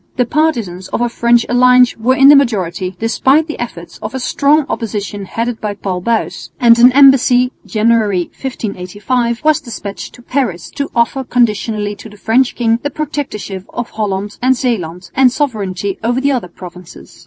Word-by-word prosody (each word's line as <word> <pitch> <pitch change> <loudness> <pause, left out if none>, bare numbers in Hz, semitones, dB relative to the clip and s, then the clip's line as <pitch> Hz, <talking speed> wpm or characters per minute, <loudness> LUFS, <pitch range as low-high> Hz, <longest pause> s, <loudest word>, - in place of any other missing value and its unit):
The 250 - +1
partisans 235 - -1
of - - -3
a 240 - +1
French 235 0 +2
alliance 250 0 +4
were 245 +4 +1
in 270 +1 +6
the 295 - +9
majority, 190 -8 0
despite 265 - +2
the 310 - -7
efforts 175 -8 -7
of - - -6
a - - -2
strong 285 +3 +2
opposition 205 -3 -4
headed 230 +3 -4
by 210 -1 -3
Paul 190 -2 -4
Buys; 230 +3 -2
and 235 -1 +5
an 245 +2 +7
embassy 260 -2 +5 0.2
(January, 215 -4 +1 0.2
1585) 230 +1 -3
was 310 0 +3
despatched 215 -6 -8
to 245 - -16
Paris 240 -11 -2
to 280 -1 -4
offer 235 +3 +1
conditionally 215 -4 0
to 220 - -11
the 210 - -15
French 240 +5 +1
king 230 -1 +1
the 290 - -2
Protectorship 275 -10 -5
of 240 -1 -4
Holland 205 -1 -3
and 255 +1 +2
Zeeland 180 -8 -3
and 260 -2 +4
sovereignty 200 -8 -3
over 240 +3 0
the 280 +1 +1
other 245 -9 -2
provinces. 180 0 -13
235 Hz, 170 wpm, -15 LUFS, 205-255 Hz, 0.2 s, the